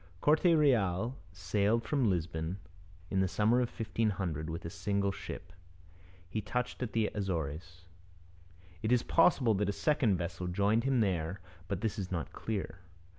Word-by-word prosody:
Corte 155 - +3
Real 125 - +3
sailed 100 +6 +1
from 135 -5 +1
Lisbon 85 0 -2 0.5
in 95 - +1
the 95 - +3
summer 105 +6 +3
of 120 - 0
1500 100 - -2
with 85 +2 -5
a - - -3
single 100 -1 0
ship. 85 0 -8 0.7
He 110 +4 -3
touched 125 +6 -3
at 120 -4 -3
the 110 -2 +1
Azores. 85 -2 -4 1.0
It 110 - -1
is 125 -1 +4
possible 140 -9 +4
that 100 0 0
a - - 0
second 125 - +2
vessel 85 +1 -4
joined 100 +6 +2
him 135 -3 +3
there, 90 -2 0 0.3
but - - -3
this 110 -1 -1
is 95 -2 -4
not 85 -4 -3
clear. 100 -4 -4
100 Hz, 155 wpm, -32 LUFS, 90-115 Hz, 1.0 s, is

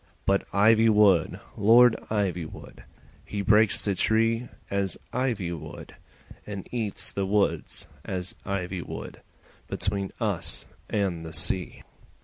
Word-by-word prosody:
But 100 0 +1
Ivywood, 105 -3 +4 0.2
Lord 115 +3 +6
Ivywood, 90 -6 -3 0.4
He 100 -1 -4
breaks 105 +1 +4
the 100 - +1
tree 115 +4 +1 0.2
as 100 -1 -1 0.2
ivy 115 -9 -1
would, 80 -2 -9 0.5
And 100 -2 -7
eats 110 -5 -3
the 100 -1 -2
woods 105 0 0 0.2
as 90 -1 -4
ivy 95 -2 -3
would - - -8 0.5
Between 100 -1 -2
us 90 -8 -1 0.2
and 95 -5 -1
the 80 0 -8
sea. 90 +3 +1
100 Hz, 115 wpm, -26 LUFS, 90-110 Hz, 0.5 s, Lord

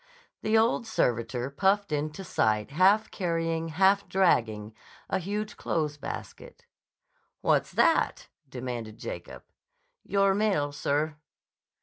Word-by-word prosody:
The 215 +1 +2
old 230 +1 +2
servitor 120 - -1
puffed 195 +5 +1
into 150 +5 -2
sight 110 - 0
half 195 +7 +4
carrying, 165 -3 -1
half 195 +5 +3
dragging 110 - +1 0.4
a 190 - +1
huge 210 +4 -4
clothes 150 -2 -1
basket. - - -8 0.8
"What's - - +2
that?" - - +2 0.2
demanded 120 -4 -6
Jacob': - - -7 0.6
"Your 195 -1 +2
mail, 195 -9 +1
sir." 145 +1 -1
165 Hz, 105 wpm, -28 LUFS, 130-195 Hz, 0.8 s, half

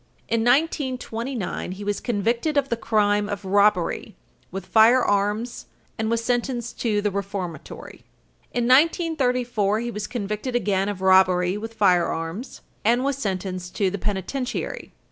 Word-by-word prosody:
In 230 - +1
1929 250 - -1
he 200 +2 -8
was 205 0 -1
convicted 240 +6 0
of 275 -1 +2
the 235 - +1
crime 210 -2 +1
of 200 -2 -5
robbery 200 0 +2 0.3
with 190 0 -6
firearms, 220 0 +3 0.3
and 220 0 -2
was 230 0 0
sentenced 240 -1 -2
to 210 -3 +1
the 205 - +1
reformatory. 195 -5 -6 0.5
In 240 - 0
1934, 250 - +2
he 240 0 -3
was 210 -2 -4
convicted 215 +2 -4
again 195 -3 +1
of 195 -2 -5
robbery 185 -1 +4
with 225 +2 -6
firearms, 180 +1 0 0.2
and 240 +4 +3
was 280 0 0
sentenced 185 -4 -4
to 195 -3 +1
the 200 - -4
penitentiary. 210 +7 -3
210 Hz, 135 wpm, -24 LUFS, 195-245 Hz, 0.5 s, robbery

